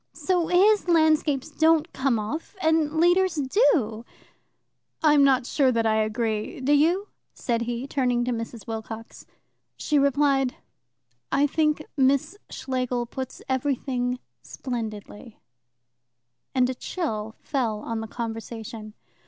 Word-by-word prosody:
So 355 Hz, -3 st, 0 dB
his 395 Hz, +3 st, +4 dB
landscapes 315 Hz, -4 st, +2 dB
don't 320 Hz, +2 st, +2 dB
come 265 Hz, -3 st, +1 dB
off, 280 Hz, -, -5 dB
and 320 Hz, -2 st, +1 dB
Leader's 350 Hz, +1 st, +3 dB
do." 265 Hz, -, +2 dB, 1.0 s
"I 305 Hz, -2 st, +6 dB
am 290 Hz, -1 st, +5 dB
not 265 Hz, -2 st, +4 dB
sure 265 Hz, 0 st, +2 dB
that 230 Hz, -2 st, 0 dB
I 220 Hz, 0 st, +2 dB
agree. 215 Hz, 0 st, -1 dB
Do 270 Hz, +3 st, +2 dB
you?" 340 Hz, +8 st, +2 dB, 0.3 s
said 235 Hz, -2 st, -1 dB
he, 240 Hz, +2 st, -3 dB
turning 250 Hz, -4 st, 0 dB
to 250 Hz, -, -1 dB
Mrs. 230 Hz, -1 st, -5 dB
Wilcox. 225 Hz, 0 st, -7 dB, 0.5 s
She 300 Hz, -1 st, +1 dB
replied: 275 Hz, -2 st, +2 dB, 0.8 s
"I 285 Hz, -, +3 dB
think 305 Hz, +1 st, 0 dB
Miss 280 Hz, +5 st, +2 dB
Schlegel 250 Hz, -2 st, -2 dB
puts 260 Hz, +2 st, -7 dB
everything 260 Hz, -2 st, -1 dB, 0.2 s
splendidly"; 225 Hz, -2 st, -7 dB, 1.2 s
and 255 Hz, -1 st, +4 dB
a 260 Hz, -, -2 dB
chill 225 Hz, -, -4 dB
fell 230 Hz, -7 st, -2 dB
on 230 Hz, 0 st, -4 dB
the 220 Hz, -, -5 dB
conversation. 225 Hz, -1 st, -6 dB
260 Hz, 125 wpm, -25 LUFS, 230-305 Hz, 1.2 s, I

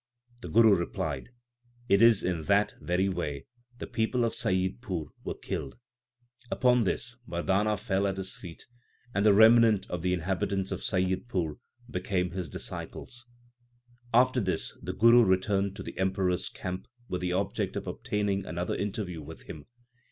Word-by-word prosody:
The -, -, -7 dB
Guru 115 Hz, -2 st, +6 dB
replied, 85 Hz, +5 st, -2 dB, 0.3 s
* 120 Hz, 0 st, -33 dB
It 100 Hz, -, +5 dB
is 115 Hz, -3 st, +6 dB
in 90 Hz, -3 st, -1 dB
that 100 Hz, +1 st, +3 dB
very 90 Hz, +2 st, +1 dB
way 75 Hz, -7 st, -3 dB, 0.3 s
the -, -, -5 dB
people 115 Hz, +2 st, 0 dB
of 115 Hz, -, -1 dB
Saiyidpur 95 Hz, -2 st, -1 dB
were -, -, -4 dB
killed/ 70 Hz, -, -5 dB, 0.7 s
Upon 125 Hz, -3 st, +3 dB
this 120 Hz, +5 st, -2 dB
Mardana 100 Hz, +5 st, +1 dB
fell 100 Hz, -2 st, 0 dB
at 95 Hz, -1 st, -2 dB
his 95 Hz, 0 st, -3 dB
feet, 85 Hz, -3 st, -10 dB, 0.5 s
and 100 Hz, -, +1 dB
the 105 Hz, -, +6 dB
remnant 110 Hz, -1 st, +6 dB
of 90 Hz, -, -3 dB
the 90 Hz, +1 st, +1 dB
inhabitants 95 Hz, +2 st, -1 dB
of -, -, -2 dB
Saiyidpur 95 Hz, -, -1 dB, 0.3 s
became 90 Hz, -4 st, -1 dB
his 90 Hz, -3 st, -4 dB
disciples. 120 Hz, -, -7 dB, 0.8 s
After 125 Hz, +2 st, +4 dB
this 95 Hz, -5 st, -2 dB
the -, -, -4 dB
Guru 115 Hz, +2 st, +6 dB
returned 95 Hz, 0 st, +1 dB
to 95 Hz, -, -7 dB
the -, -, -8 dB
Emperor 95 Hz, 0 st, +1 dB
s 90 Hz, +1 st, -2 dB
camp 90 Hz, 0 st, -6 dB, 0.2 s
with 90 Hz, -, -3 dB
the 90 Hz, 0 st, -1 dB
object 95 Hz, +2 st, -1 dB
of -, -, -3 dB
obtaining 100 Hz, -2 st, -1 dB
another 85 Hz, +2 st, -2 dB
interview 95 Hz, -4 st, -3 dB
with 80 Hz, +2 st, -10 dB
him. 75 Hz, -, -10 dB
95 Hz, 160 wpm, -29 LUFS, 90-110 Hz, 0.8 s, Guru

